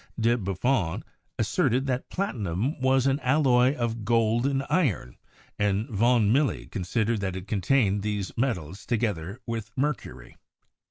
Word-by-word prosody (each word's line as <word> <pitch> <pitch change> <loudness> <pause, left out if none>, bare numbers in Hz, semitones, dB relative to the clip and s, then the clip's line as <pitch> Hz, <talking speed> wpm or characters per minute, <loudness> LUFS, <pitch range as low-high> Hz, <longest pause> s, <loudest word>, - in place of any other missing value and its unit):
De 115 +1 +3
Buffon 100 -2 -1 0.3
asserted 130 +3 +1
that 130 -2 -2
platinum 120 - -2
was 130 0 +3
an 135 +1 +2
alloy 130 -1 +3
of 115 -3 -2
gold 115 +2 +2
and 135 -1 0
iron, 140 - 0 0.4
and 105 +2 +1
von 115 0 +3
Milly 140 0 +1
considered 110 +3 -1
that 95 -2 -2
it 95 +1 -7
contained 105 0 +1
these 105 -2 -3
metals, 100 - -2
together 105 -4 -2
with 115 -2 -4
mercury. 130 - -3
115 Hz, 130 wpm, -26 LUFS, 100-130 Hz, 0.4 s, De